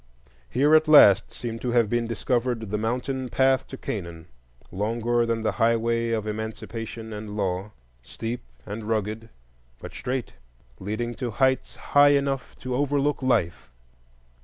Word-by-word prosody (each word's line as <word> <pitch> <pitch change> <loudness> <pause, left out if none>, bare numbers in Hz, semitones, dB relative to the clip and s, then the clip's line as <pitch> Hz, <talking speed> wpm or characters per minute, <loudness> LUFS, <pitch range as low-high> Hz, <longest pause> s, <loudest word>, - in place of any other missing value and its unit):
Here 145 - +3
at 155 0 +6
last 105 -10 +7
seemed 115 -1 -6
to 125 -1 -2
have 120 -3 +4
been 120 +2 0
discovered 115 -2 -1
the 105 - 0
mountain 125 +3 -2
path 130 +1 +2
to 135 - -8
Canaan; 85 -9 -6 0.5
longer 115 +4 0
than 115 -1 -1
the - - +1
highway 115 0 +2
of 110 -2 -1
Emancipation 110 +1 -6
and 105 0 -7
law, 95 0 -2 0.3
steep 115 - -5 0.2
and 105 +1 -6
rugged, 110 +1 -2 0.5
but - - -9
straight, 125 -1 -4 0.5
leading 110 +5 -3
to 125 0 -4
heights 130 +3 +1 0.2
high 145 0 +7
enough 140 -2 -2
to 130 0 -4
overlook 145 +2 0
life. 105 -10 0
115 Hz, 140 wpm, -25 LUFS, 110-130 Hz, 0.5 s, last